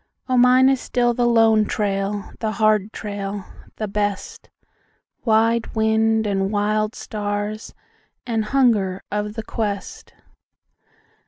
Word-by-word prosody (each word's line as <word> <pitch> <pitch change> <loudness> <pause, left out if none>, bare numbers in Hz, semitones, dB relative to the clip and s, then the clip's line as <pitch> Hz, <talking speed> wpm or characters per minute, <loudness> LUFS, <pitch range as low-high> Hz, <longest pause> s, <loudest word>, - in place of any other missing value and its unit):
O 255 - +1
mine 250 +1 +6
is 270 -1 +2
still 240 -1 +1
the 240 0 +1
lone 225 -2 +4
trail, 200 -1 -2
the 220 -1 -2
hard 215 -1 +2
trail, 200 -2 -5 0.3
the 215 - -3
best, 205 -1 -3 0.8
Wide 230 +1 +2
wind, 220 0 +2
and 195 -1 0
wild 215 +2 0
stars, 205 0 -4 0.5
and 225 -3 -1
hunger 210 -7 +1
of 210 +1 -3
the 225 - -4
quest! 205 -3 -5
215 Hz, 115 wpm, -21 LUFS, 205-225 Hz, 0.8 s, mine